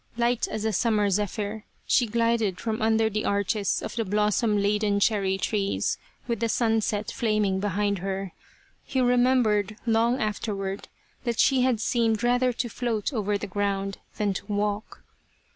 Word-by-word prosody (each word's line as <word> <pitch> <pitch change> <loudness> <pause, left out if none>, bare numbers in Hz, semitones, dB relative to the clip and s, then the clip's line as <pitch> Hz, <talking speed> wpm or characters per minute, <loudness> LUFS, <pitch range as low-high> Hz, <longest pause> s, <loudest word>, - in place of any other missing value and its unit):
Light 240 0 +1
as 215 0 -4
a 220 - 0
summer 210 -1 +2
zephyr 210 +2 -2 0.2
she 245 - +3
glided 230 -4 +1
from 220 -1 -2
under 220 0 +3
the 215 0 -2
arches 200 0 0
of - - -5
the 230 - 0
blossom 210 +1 +1
laden 205 0 +1
cherry 195 -2 +2
trees 200 0 -1 0.3
with 235 -3 -1
the 230 0 0
sunset 220 -2 0
flaming 215 -4 0
behind 200 0 0
her. 195 0 -3 0.5
He 265 - -2
remembered 245 -5 +2
long 230 +2 +2
afterward 200 -2 -3 0.4
that 235 -3 -2
she 265 -2 +4
had 250 -3 +2
seemed 225 -1 +1
rather 245 +1 +3
to 245 0 -2
float 235 0 -2
over 210 -3 0
the - - -5
ground 195 0 -2 0.2
than 205 -2 +1
to 190 - -6
walk. 205 +1 -2
215 Hz, 155 wpm, -26 LUFS, 200-230 Hz, 0.5 s, she